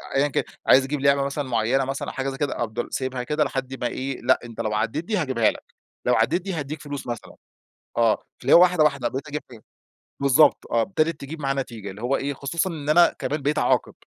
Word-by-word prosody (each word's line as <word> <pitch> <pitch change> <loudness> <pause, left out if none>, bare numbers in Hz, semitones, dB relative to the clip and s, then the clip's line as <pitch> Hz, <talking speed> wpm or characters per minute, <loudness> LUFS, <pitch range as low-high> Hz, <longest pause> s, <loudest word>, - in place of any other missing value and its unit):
أيًا 140 +2 +3
كان، 140 - -1 0.2
عايز 130 - +7
يجيب 140 0 -3
لعبة 140 0 +4
مثلًا 140 -1 -3
معينة 120 +3 +1
مثلًا 135 +1 -4
أو - - -5
حاجة 135 0 -2
زي 135 - -6
كده، 145 -1 -2
أفضل 115 +1 -4
سايبها 130 -1 -2
كده 150 +2 +1
لحد 135 -1 -4
ما 120 - +1
إيه، 135 +1 -4
لأ - - +3
أنت 115 -2 -6
لو 105 -1 -2
عديت 115 +10 -1
دي 215 -1 -1
هاجيبها 130 -9 +2
لك، - - -12 0.4
لوعديت 145 +11 +2
دي 195 0 -4
هاديك 150 -1 -5
فلوس 145 -3 -6
مثلًا. 120 - -6 0.6
آه، 115 -2 +3 0.2
فاللي - - 0
هو 170 - +9
واحدة، 180 -4 +4
واحدة 140 -5 +1
بقيت 135 +3 -5
أجيبها 150 +1 -4
يعني. 115 -3 -14 0.6
بالضبط، 140 +3 +4
آه، 115 -1 +3
ابتدت 160 -3 0
تجيب 150 +3 -7
معاه 135 -1 0
نتيجة. 115 -7 -5
اللي 105 +4 -10
هو 135 +3 +1
إيه، 140 +1 -3
خصوصًا 160 +7 -2
إن 150 -3 -6
أنا 170 +3 +5
كمان 150 -1 -2
بقيت 150 +2 0
أعاقب. - - +1
135 Hz, 225 wpm, -24 LUFS, 125-150 Hz, 0.6 s, هو